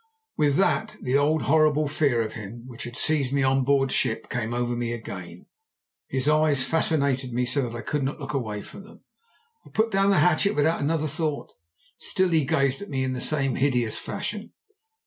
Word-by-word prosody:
"With 145 -2 +2
that 215 +4 +1
the 130 +1 -1
old 150 +2 +2
horrible 155 0 +3
fear 140 -6 +1
of 110 - -6
him 110 +2 -8
which 125 -3 -8
had 120 0 -8
seized 145 -5 +1
me 140 -1 +1
on 135 0 +2
board 135 0 +2
ship 110 0 -1
came 115 -2 -2
over 120 0 -1
me 120 0 -2
again. 90 -6 -8 0.6
His 130 +1 -1
eyes 155 -3 +3
fascinated 140 -5 0
me 125 +1 0
so 140 +3 0
that 115 - -8
I - - -5
could 150 - -2
not 135 +4 -2
look 150 0 -6
away 110 -6 -3
from 200 - -11
them. 210 - -17 0.6
I - - -16
put 220 +1 0
down 195 +1 +3
the 195 - +4
hatchet 180 +4 +3
without 155 +3 +2
another 155 +2 0
thought. 155 0 -3 0.5
Still 185 -1 +1
he 160 -4 +2
gazed 135 +2 +1
at 200 - -8
me 135 -2 -1
in 130 0 -1
the 125 - -4
same 135 -4 +1
hideous 125 -5 +1
fashion. - - -5
140 Hz, 200 wpm, -25 LUFS, 125-155 Hz, 0.6 s, the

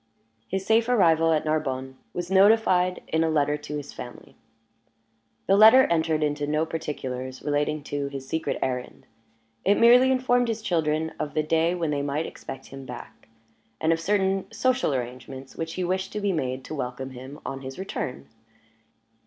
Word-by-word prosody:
His 190 0 -3
safe 225 +2 +3
arrival 165 -8 +4
at 155 -1 +1
Narbonne 135 -4 -2 0.2
was 175 +1 -5
notified 190 -2 +4
in 160 +1 +2
a 165 - +1
letter 150 -1 +2
to 150 0 -6
his 145 -1 -8
family. 120 - -10 1.1
The 195 - +4
letter 220 +6 +8
entered 160 -2 +1
into 145 -1 -1
no 155 +2 +1
particulars 130 -5 -5
relating 150 +1 0
to 145 -1 -3
his 135 -1 -7
secret 160 +4 -2
errand: 125 -1 -4 0.6
it 200 - +3
merely 245 +3 +6
informed 245 -1 +2
his 225 -1 -3
children 160 -4 0
of 150 0 -4
the 155 - +2
day 165 +3 +1
when 165 -3 -1
they 145 -1 0
might 145 +3 -1
expect 135 0 -9
him 135 0 -9
back, 125 -4 -10 0.5
and 160 +1 +3
of 165 - -2
certain 195 +1 0
social 255 - +1
arrangements 130 +2 -6
which 165 0 -4
he 185 - -2
wished 185 +2 -1
to 210 - -2
be 200 -1 0
made 130 -4 -2
to - - -7
welcome 130 -1 -4
him 130 +4 -10
on 135 0 -5
his 130 0 -8
return. 190 -9 -5
155 Hz, 170 wpm, -25 LUFS, 135-190 Hz, 1.1 s, letter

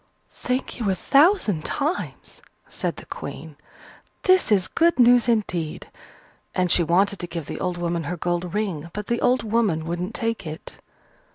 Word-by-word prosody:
"Thank 255 +1 -3
you 220 -4 0
a 190 - +2
thousand 275 - +3
times," 300 +5 -3 0.3
said - - -3
the - - -11
Queen, - - -8 0.7
"this 370 - +4
is 195 -3 +3
good 340 +1 +2
news 245 -1 +5
indeed!" 180 -8 -1 0.6
And 180 -2 +1
she - - +5
wanted 190 +4 +2
to 175 - -4
give 165 -2 -5
the - - -6
old 180 -1 -2
woman 170 -2 -2
her 175 +4 -3
gold 175 +2 -2
ring; 180 -7 -2
but 210 0 -5
the 235 +2 -1
old 250 0 +2
woman 210 -8 +1
wouldn't 175 +2 -4
take 230 -6 -2
it. 155 +2 -9
195 Hz, 165 wpm, -23 LUFS, 175-235 Hz, 0.7 s, news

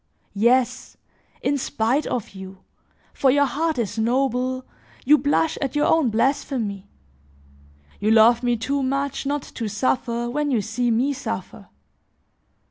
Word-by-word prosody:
Yes, 240 +4 +1 0.5
in 285 0 +1
spite 260 +2 0
of 240 -5 -3
you, 190 -1 -11 0.5
for 270 - +2
your 285 +2 +4
heart 310 +4 -1
is 225 -2 -2
noble, 255 +2 0 0.4
you 300 +3 +6
blush 290 +3 +1
at 275 -1 -2
your 295 - +2
own 320 -6 +3
blasphemy; 225 -4 -1 1.1
you 210 - 0
love 230 +2 +5
me 245 -1 +1
too 275 +6 -1
much 275 +1 -2
not 290 0 -1
to 230 - -6
suffer 235 +2 -1
when 290 +4 -1
you 250 -5 +2
see 225 +4 -1
me 250 +5 +1
suffer. - - -6
250 Hz, 135 wpm, -23 LUFS, 225-280 Hz, 1.1 s, you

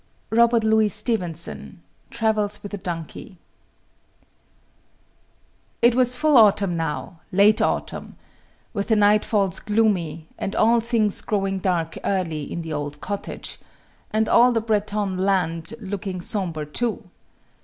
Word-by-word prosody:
ROBERT 235 0 +4
LOUIS 220 -2 +3
STEVENSON, 185 -7 -3 0.3
Travels 215 -3 -1
with 205 - -8
a - - -2
Donkey. 175 +1 -7 2.5
It 240 0 +6
was 250 0 +3
full 300 +1 +3
autumn 200 -4 +5
now, 165 +1 -4
late 205 +3 +4
autumn - - -2 0.6
with 200 -3 -2
the 220 - +3
nightfalls 205 -2 +2
gloomy, 180 -8 0
and 195 - -3
all 230 +2 +4
things 225 -3 0
growing 195 -2 -1
dark 175 -4 -1
early 165 -7 -2
in 170 - -4
the 160 -1 -5
old 145 0 -4
cottage, 200 +4 -6 0.5
and 220 0 +1
all 245 +1 +5
the 230 - +1
Breton 210 -3 -1
land 180 -1 0
looking 195 -3 -5
sombre, 175 -5 -3
too. 220 +6 -3
205 Hz, 125 wpm, -23 LUFS, 175-220 Hz, 2.5 s, It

